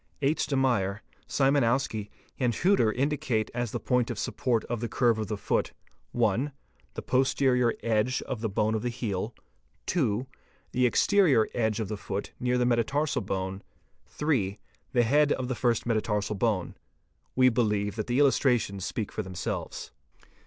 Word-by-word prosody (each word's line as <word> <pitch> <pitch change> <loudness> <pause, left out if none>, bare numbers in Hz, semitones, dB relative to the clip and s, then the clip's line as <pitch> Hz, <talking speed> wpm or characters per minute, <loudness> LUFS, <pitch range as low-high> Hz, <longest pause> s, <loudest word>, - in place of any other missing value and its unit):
H. 145 +4 +1
de 140 - -1
Meyer®®, 110 -7 +1 0.3
Szymanowskt®", 135 -6 +1 0.3
and 125 -3 +2
Heuter®®, 175 - +3
indicate 135 -5 0
as 120 -1 -2
the - - -3
point 125 -2 +1
of - - -4
support 125 -5 -1
of 120 -1 -3
the 120 0 -3
curve 120 -3 +2
of 110 - -2
the 105 - -3
foot: - - -1 0.4
(1) 120 +4 +1 0.4
the - - -5
posterior 130 -1 +2
edge 115 +3 +1
of 120 -4 -5
the 110 - -1
bone 105 +2 +1
of 110 - -1
the 120 - -1
heel; 110 -2 -3 0.5
(2) 125 - 0 0.5
the 125 0 +3
exterior 150 - +4
edge 110 -3 0
of 110 - -2
the 105 +1 -4
foot 100 0 -5
near 125 0 +1
the 125 - +2
metatarsal 125 +6 +1
bone; 95 -1 -3 0.6
(8) 115 -10 +1 0.3
the 120 -2 +3
head 145 +5 +3
of 130 -1 -3
the - - 0
first 120 -2 0
metatarsal 105 -3 0
bone. 100 -3 0 0.6
We 130 0 +6
believe 105 -4 0
that 110 -2 -3
the 120 +1 0
illustrations 125 -8 +2
speak 105 +2 -3
for - - -3
themselves. 95 -4 -5
120 Hz, 160 wpm, -28 LUFS, 105-130 Hz, 0.6 s, We